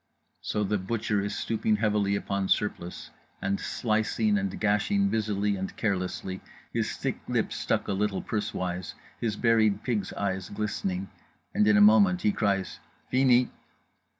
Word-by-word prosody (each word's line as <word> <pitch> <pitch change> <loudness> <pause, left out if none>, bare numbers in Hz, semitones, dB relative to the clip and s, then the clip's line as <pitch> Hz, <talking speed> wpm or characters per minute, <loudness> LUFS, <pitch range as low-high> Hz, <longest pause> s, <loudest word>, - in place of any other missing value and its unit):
—So 105 - -1
The 105 0 0
Butcher 105 +1 -1
is 100 - -3
stooping 110 -1 0
heavily 105 -2 +1
upon 100 -1 -1
Surplice 90 -4 -1 0.3
and 100 0 -1
slicing 110 -1 0
and 95 -2 -2
gashing 200 - +2
busily 105 - 0
and 95 0 -5
carelessly, 95 -2 -2 0.3
his - - -1
thick - - -2
lips - - 0
stuck - - 0
a - - 0
little 100 0 -1
pursewise, 95 -4 -3 0.2
his 110 -3 -1
buried 110 -3 +3
pig's 105 -6 -1
eyes 95 -2 -2
glistening—and 100 0 -3
in 105 -1 +5
a - - +6
moment 105 -4 +6
he 105 - +4
cries 100 -3 -1 0.3
"_Fini! 125 -1 +4
105 Hz, 140 wpm, -28 LUFS, 95-110 Hz, 0.3 s, a